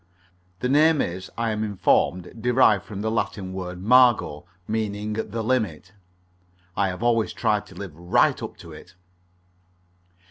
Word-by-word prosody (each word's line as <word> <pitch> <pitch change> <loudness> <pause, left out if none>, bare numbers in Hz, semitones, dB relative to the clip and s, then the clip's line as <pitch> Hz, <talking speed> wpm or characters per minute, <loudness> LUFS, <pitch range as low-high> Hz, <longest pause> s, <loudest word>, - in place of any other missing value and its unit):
The 125 - 0
name 150 +3 +4
is, 95 -2 -3
I 115 -1 0
am 110 0 -2
informed, 100 0 0
derived 120 -5 +3
from 100 -3 -7
the 110 +1 -1
Latin 95 -4 -3
word 90 -1 -6
margo, 120 -10 +4 0.2
meaning 105 -1 -2
the 110 +1 -4
limit. 105 -8 -1 0.8
I 100 - +1
have 90 +4 -5
always 115 -2 +1
tried 105 -1 0
to - - -15
live 95 -7 -8
right 85 +2 +2
up - - -7
to 85 - -12
it. 85 +4 -14
105 Hz, 145 wpm, -24 LUFS, 95-115 Hz, 0.8 s, name